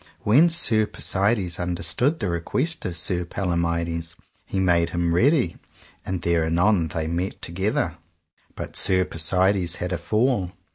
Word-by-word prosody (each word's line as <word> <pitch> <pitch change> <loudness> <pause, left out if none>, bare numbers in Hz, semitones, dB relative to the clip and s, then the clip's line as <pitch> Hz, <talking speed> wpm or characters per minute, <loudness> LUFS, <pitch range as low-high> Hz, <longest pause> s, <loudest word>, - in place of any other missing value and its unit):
When 145 +11 +5
Sir 110 -10 +3
Persides 95 -4 0
understood 90 - 0
that 100 - -1
request 130 - -2
of 85 -2 -2
Sir 90 +1 0
Palomides, 85 -2 -2 0.3
he 95 - -2
made 85 -3 +2
him 85 -1 -1
ready, 125 - +2 0.5
and 95 -2 -4
there 85 -1 +2
anon 85 +2 +2
they 80 0 -3
met 85 +4 -3
together, 95 +5 -2 0.6
but - - -7
Sir 95 -1 +3
Persides 90 +2 +1
had 90 +1 -4
a 90 - -2
fall. 105 -1 0
90 Hz, 140 wpm, -23 LUFS, 85-100 Hz, 0.6 s, When